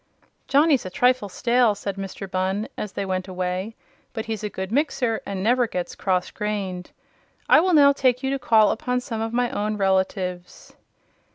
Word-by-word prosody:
"Johnny's 285 -1 +4
a 185 - -6
trifle 245 +2 +2
stale," 235 +1 +2
said 200 -1 -5
Mr. 195 0 -6
Bunn, 190 +3 -1
as 210 - -5
they 200 - -3
went 185 0 -2
away; 185 +3 -3 0.4
"but 220 -2 -4
he's 220 -2 -4
a 210 - -2
good 190 0 -6
mixer 255 -4 0
and 195 -1 -4
never 245 +2 +3
gets 180 -4 -4
cross 185 -2 -1
grained. 195 -4 -4 0.6
I - - +7
will 365 +2 +2
now 280 -2 +7
take 255 -2 +1
you 265 - 0
to 275 - -1
call 220 -4 +4
upon 250 +2 -1
some 225 -2 -5
of 225 0 -2
my 245 +1 0
own 210 +1 -2
relatives." 190 -2 -2
210 Hz, 180 wpm, -23 LUFS, 190-245 Hz, 0.6 s, I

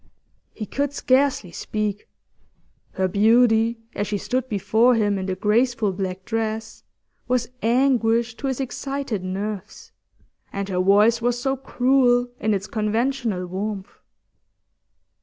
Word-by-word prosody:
He 215 - -5
could 285 +5 -2
scarcely 260 -9 +1
speak; 210 +2 -3 0.8
her 190 -1 0
beauty, 225 +3 +4 0.2
as 205 - -2
she 210 - -1
stood 255 +5 -2
before 225 +4 +3
him 205 -3 +1
in 190 - -4
the 190 - -1
graceful 225 +1 +1
black 185 0 -4
dress, 220 -1 -3 0.5
was 245 -2 0
anguish 235 -1 +2
to 275 - -3
his 265 -1 -2
excited 270 -5 -3
nerves, 200 +2 -5 0.6
and 200 0 -4
her 180 -1 -1
voice 210 +5 +4
was 240 +1 0
so 270 +2 0
cruel 250 -2 +2
in 215 0 +1
its 195 0 -3
conventional 220 -2 -1
warmth. 195 +2 -5
225 Hz, 125 wpm, -23 LUFS, 200-245 Hz, 0.8 s, beauty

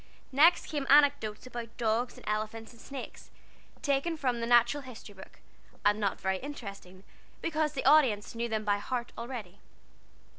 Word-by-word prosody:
Next 320 +6 +5
came 290 -3 -3
anecdotes 280 -7 +4
about 235 -2 -8
dogs 235 +1 0
and - - -14
elephants 215 +1 -3
and 235 -1 -16
snakes, 275 -2 -9 0.5
taken 285 +4 0
from 250 -5 -1
the 230 - -2
Natural 240 +4 +4
History 245 -5 -11
book, 190 -1 -14 0.4
and 205 +1 +4
not 200 -2 -1
very 190 0 -1
interesting, 200 -9 -9 0.4
because 310 -2 -1
the 270 - -4
audience 250 -10 +4
knew 235 +1 -3
them 215 -1 -2
by 205 0 +2
heart 240 +3 -4
already. 230 -6 -7
235 Hz, 155 wpm, -30 LUFS, 215-275 Hz, 0.5 s, Next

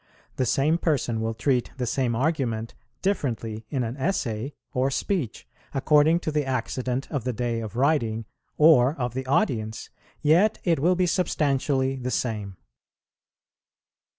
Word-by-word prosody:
The 130 - +1
same 150 +8 +2
person 130 -9 0
will 115 0 -2
treat 125 0 +1
the 125 - -1
same 120 0 0
argument 120 -5 -1 0.3
differently 115 - -2
in 130 -3 -1
an 115 +2 -3
essay 135 - -2 0.2
or 130 0 +1
speech, 140 - -2 0.3
according 150 +4 +4
to 155 - -2
the 150 -1 +1
accident 130 0 -2
of 140 -6 -2
the 125 0 -1
day 120 0 -1
of 110 -1 -6
writing, 120 -5 +1 0.3
or 150 -3 +6
of 125 -4 -3
the 130 +1 -4
audience, 110 -5 0 0.3
yet 180 +9 +4
it 170 -4 +2
will 175 +6 +3
be 180 0 +2
substantially 140 -6 +1
the 125 -1 -3
same. 105 -7 -2
130 Hz, 145 wpm, -25 LUFS, 115-150 Hz, 0.3 s, or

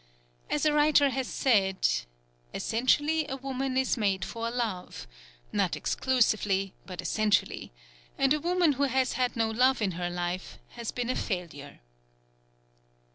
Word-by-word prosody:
As 300 - 0
a 305 - +4
writer 295 -2 +4
has 265 -1 -2
said: 195 -7 +2 0.7
"Essentially, 290 +7 +1
a 270 - -3
woman 265 0 -3
is 265 0 +1
made 195 -4 0
for 230 0 -4
love 230 -7 -4 0.5
not - - +1
exclusively, 210 -6 +1
but 185 -2 -6
essentially; 215 -1 0 0.5
and 275 +1 +3
a 300 - 0
woman 350 -1 +3
who 280 +2 +1
has 260 -1 +1
had 250 -1 0
no 225 -1 +1
love 255 +4 +3
in 205 -4 0
her 175 0 -3
life 175 +1 -4
has 235 -2 -6
been 245 0 -2
a - - -2
failure." 160 - -5
240 Hz, 140 wpm, -28 LUFS, 195-270 Hz, 0.7 s, a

